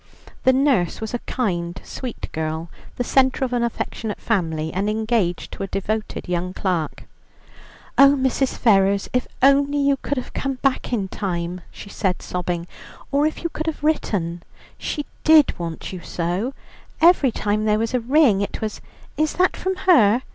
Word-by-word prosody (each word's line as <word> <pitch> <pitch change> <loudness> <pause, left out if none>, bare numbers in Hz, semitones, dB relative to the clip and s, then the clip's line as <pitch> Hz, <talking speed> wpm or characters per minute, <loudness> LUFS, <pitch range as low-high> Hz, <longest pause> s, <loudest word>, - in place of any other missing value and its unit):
The 260 - +7
nurse 260 -9 +2
was 220 +1 -5
a 245 - -1
kind, 175 -8 -2
sweet 250 -3 -6
girl, 160 +1 -3 0.2
the 245 - -1
centre 265 +1 +2
of 250 - -4
an 240 - +1
affectionate 230 -2 -3
family, 160 -7 -1
and 200 +3 0
engaged 215 -5 0
to - - -8
a 195 - -2
devoted 215 +3 -3
young 180 +1 -2
clerk. 175 -5 -2 1.0
"Oh, 275 +1 +8
Mrs. 265 0 0
Ferrers, 200 -3 +3
if 250 0 0 0.2
only 280 +1 +4
you 280 -1 +3
could 285 +1 -3
have 255 - -5
come 270 -1 -2
back 270 -2 +1
in 210 -6 0
time," 180 -2 -3
she 200 - -11
said, 185 -2 -1
sobbing, 175 -1 -3 0.5
"or 285 +2 +3
if 310 - -5
you 335 - 0
could 315 0 -5
have 315 -2 -3
written. 180 - 0 0.3
She 295 - -4 0.2
did 310 - +5
want 170 +1 -5
you 185 - -5
so; 180 - -2 0.4
every 325 -6 +5
time 210 0 -1
there 210 0 +3
was 225 +2 -1
a 250 - +2
ring 245 -4 +4
it 200 - -3
was, 215 -1 -4 0.4
'Is 310 0 +1
that 365 +1 +2
from 375 +1 -2
her?' 250 - +5
220 Hz, 170 wpm, -22 LUFS, 180-275 Hz, 1.0 s, Oh